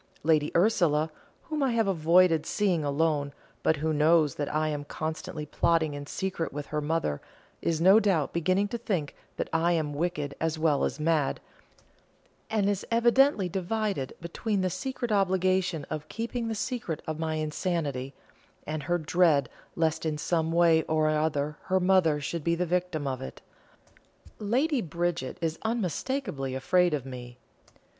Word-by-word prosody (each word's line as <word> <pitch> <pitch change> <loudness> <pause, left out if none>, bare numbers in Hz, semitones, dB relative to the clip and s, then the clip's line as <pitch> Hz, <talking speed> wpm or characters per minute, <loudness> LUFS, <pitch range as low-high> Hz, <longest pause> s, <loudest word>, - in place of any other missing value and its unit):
Lady 155 -1 +3
Ursula, 170 -6 +2 0.3
whom 310 -1 -3
I 265 -3 +2
have 225 -3 +2
avoided 165 -2 +4
seeing 190 -7 +1
alone, 145 0 0 0.3
but 160 - +3
who 155 +1 -1
knows 155 0 +4
that 145 - -3
I 155 +1 0
am 145 -1 -3
constantly 155 +1 -5
plotting 160 0 +1
in 145 0 -7
secret 185 -2 -3
with 145 +1 -5
her 150 0 -3
mother, 150 - -1 0.4
is 165 -2 0
no 190 +5 +7
doubt 185 -9 +1
beginning 185 +4 +1
to 235 - -4
think 180 -11 -2 0.2
that - - -2
I 165 +2 +3
am 155 -3 -1
wicked 150 -2 -2
as 160 0 0
well 155 -3 +2
as - - -3
mad, 155 -2 +1 1.1
and 210 -3 +1
is 200 -2 0
evidently 235 -2 +4
divided 190 -4 -2
between 190 +4 -2
the 185 -1 0
secret 255 +2 -4
obligation 185 -4 +1
of 155 0 -5
keeping 230 +1 -3
the 225 - -2
secret 220 - -3
of 155 0 -4
my 160 -1 -1
insanity, 150 -4 -2 0.5
and 155 0 -3
her 175 +4 0
dread 160 -5 +2 0.3
lest 160 -1 0
in 155 -2 -1
some 160 +1 0
way 165 -1 +5
or 155 -1 +2
other 150 -1 0
her 190 0 +2
mother 180 -5 +3
should 160 +2 -4
be 170 +1 +2
the 180 +1 -1
victim 180 -3 -1
of 130 -2 -3
it. 65 - -7 1.0
Lady 255 +7 +1
Bridget 170 -5 -2
is 165 -1 -2
unmistakably 205 - -2
afraid 175 +5 +2
of 135 -3 -5
me. 125 -2 -8
165 Hz, 160 wpm, -28 LUFS, 150-185 Hz, 1.1 s, no